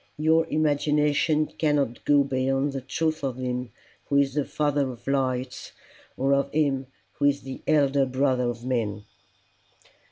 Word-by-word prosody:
Your 160 Hz, +2 st, +3 dB
imagination 150 Hz, 0 st, +2 dB
cannot 145 Hz, -6 st, 0 dB
go 145 Hz, -1 st, +5 dB
beyond 135 Hz, +1 st, 0 dB
the 135 Hz, -, -4 dB
truth 155 Hz, +4 st, -2 dB
of 130 Hz, -3 st, -2 dB
him 125 Hz, -1 st, -3 dB, 0.4 s
who 140 Hz, -, -1 dB
is 140 Hz, -1 st, +2 dB
the 145 Hz, -1 st, 0 dB
Father 145 Hz, -2 st, 0 dB
of 120 Hz, -1 st, -10 dB
lights, 130 Hz, -2 st, -2 dB, 0.4 s
or 135 Hz, +1 st, +2 dB
of 140 Hz, 0 st, +1 dB
him 140 Hz, -3 st, 0 dB, 0.3 s
who 145 Hz, -, +2 dB
is 140 Hz, 0 st, +2 dB
the 135 Hz, -1 st, -8 dB
Elder 140 Hz, -3 st, +3 dB
Brother 130 Hz, -1 st, +1 dB
of 120 Hz, 0 st, -6 dB
men." 110 Hz, -5 st, -2 dB
140 Hz, 150 wpm, -25 LUFS, 130-145 Hz, 0.4 s, go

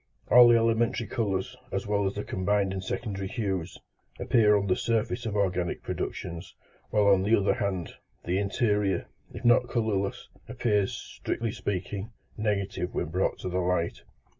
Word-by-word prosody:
All 120 Hz, 0 st, +9 dB
the 120 Hz, -1 st, +6 dB
elementary 115 Hz, 0 st, +1 dB
colours, 100 Hz, -5 st, -2 dB, 0.2 s
as -, -, -2 dB
well 100 Hz, -1 st, +1 dB
as 95 Hz, -, -3 dB
the 105 Hz, -, -3 dB
combined 100 Hz, 0 st, 0 dB
and 95 Hz, -1 st, -4 dB
secondary 100 Hz, -1 st, -3 dB
hues, 95 Hz, -6 st, -3 dB, 0.4 s
appear 105 Hz, -3 st, +4 dB
on 100 Hz, -, -1 dB
the 90 Hz, -2 st, +2 dB
surface 115 Hz, +1 st, -1 dB
of 105 Hz, -, -3 dB
organic 90 Hz, -3 st, 0 dB
productions, 85 Hz, 0 st, -5 dB, 0.3 s
while 105 Hz, -1 st, +2 dB
on 100 Hz, -2 st, +5 dB
the 105 Hz, +4 st, +4 dB
other 100 Hz, -, +2 dB
hand, 95 Hz, -4 st, -2 dB, 0.3 s
the 90 Hz, +2 st, +1 dB
interior, 105 Hz, -1 st, +1 dB, 0.3 s
if -, -, -8 dB
not 120 Hz, +1 st, +5 dB
colourless, 105 Hz, -5 st, -1 dB, 0.2 s
appears, 110 Hz, -5 st, +1 dB
strictly 115 Hz, -1 st, -4 dB
speaking, 100 Hz, +1 st, -4 dB, 0.3 s
negative 100 Hz, -4 st, -2 dB
when -, -, -1 dB
brought 90 Hz, +3 st, 0 dB
to -, -, -3 dB
the 90 Hz, +1 st, -1 dB
light. 90 Hz, -2 st, 0 dB
100 Hz, 160 wpm, -28 LUFS, 95-110 Hz, 0.4 s, All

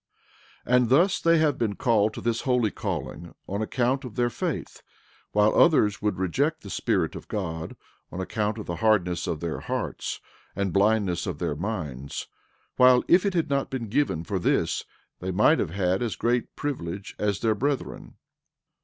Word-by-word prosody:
13:4 125 Hz, -, -1 dB
And 125 Hz, -2 st, +3 dB
thus 170 Hz, +9 st, +4 dB
they 165 Hz, 0 st, +4 dB
have 150 Hz, -3 st, +2 dB
been 110 Hz, -3 st, 0 dB
called 110 Hz, -2 st, +2 dB
to -, -, -6 dB
this 115 Hz, -1 st, 0 dB
holy 125 Hz, -5 st, +1 dB
calling 85 Hz, +2 st, -5 dB
on 100 Hz, +2 st, -3 dB
account 125 Hz, +4 st, 0 dB
of 125 Hz, -5 st, -8 dB
their 120 Hz, -1 st, +1 dB
faith, -, -, -4 dB, 0.5 s
while 105 Hz, +1 st, +3 dB
others 105 Hz, -12 st, +4 dB
would 105 Hz, 0 st, 0 dB
reject 135 Hz, -, 0 dB
the 100 Hz, -, -8 dB
Spirit -, -, 0 dB
of -, -, -9 dB
God 80 Hz, -5 st, -4 dB, 0.4 s
on 90 Hz, -, -6 dB
account 105 Hz, +3 st, -2 dB
of 105 Hz, -, -6 dB
the 85 Hz, -, -4 dB
hardness 90 Hz, -4 st, +1 dB
of 75 Hz, -, -3 dB
their 85 Hz, -2 st, -3 dB
hearts -, -, -4 dB, 0.4 s
and 100 Hz, -2 st, -1 dB
blindness 100 Hz, -4 st, +2 dB
of 90 Hz, -5 st, -3 dB
their 75 Hz, -, -2 dB
minds, 75 Hz, -, -4 dB, 0.5 s
while, 125 Hz, 0 st, +6 dB
if 180 Hz, +3 st, +5 dB
it 195 Hz, -, -1 dB
had 165 Hz, -4 st, 0 dB
not 140 Hz, -1 st, 0 dB
been 120 Hz, -, -1 dB
for 95 Hz, +3 st, -2 dB
this -, -, 0 dB, 0.3 s
they 95 Hz, -, -4 dB
might 105 Hz, -, +4 dB
have 90 Hz, -, 0 dB
had 95 Hz, +2 st, 0 dB
as 120 Hz, -3 st, -1 dB
great 120 Hz, 0 st, -1 dB
privilege 100 Hz, -9 st, -4 dB
as 100 Hz, -2 st, 0 dB
their 110 Hz, -1 st, +3 dB
brethren. 140 Hz, +5 st, -3 dB
105 Hz, 175 wpm, -26 LUFS, 95-125 Hz, 0.5 s, while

